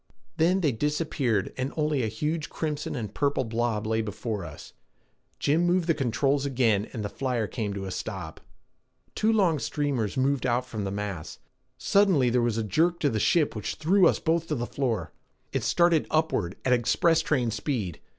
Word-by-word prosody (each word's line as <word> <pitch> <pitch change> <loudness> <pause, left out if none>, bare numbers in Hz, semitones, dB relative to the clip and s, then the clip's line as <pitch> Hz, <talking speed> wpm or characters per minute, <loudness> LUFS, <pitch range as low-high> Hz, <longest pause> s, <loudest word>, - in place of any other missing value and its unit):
Then 180 +4 +3
they 150 -5 +2
disappeared 135 - -1
and 130 +2 -2
only 150 -3 +1
a 115 - 0
huge 150 +8 -2
crimson 150 -3 -3
and 110 -5 -5
purple 140 0 +1
blob 115 -2 -1
lay 110 +1 +1
before 105 -1 -4
us. 80 -3 -10 0.6
Jim 155 +4 +2
moved 175 0 +2
the 165 - +3
controls 135 +1 +1
again 120 -7 +1
and 110 -3 -4
the - - 0
flyer 125 -1 -2
came 105 -1 -3
to 95 -1 -4
a 95 - -5
stop. 80 -3 -6 0.7
Two 220 +1 +2
long 185 -8 +3
streamers 135 -8 -1
moved 135 0 +1
out 125 +1 +1
from 110 -5 -5
the 95 - -3
mass. 100 -5 -5 0.4
Suddenly 185 -12 +3
there 125 0 +3
was 120 -2 0
a 115 - 0
jerk 165 - +1
to 145 - +2
the 110 - -1
ship 155 +4 +2
which 105 - -4
threw 180 +3 +4
us - - +2
both 165 0 0
to 155 - -1
the 120 -2 -2
floor. 125 -4 -2 0.4
It - - 0
started 170 -3 +3
upward 155 - 0
at 130 - +4
express 160 +7 +3
train 130 -7 0
speed. 105 - -3
130 Hz, 185 wpm, -27 LUFS, 110-155 Hz, 0.7 s, threw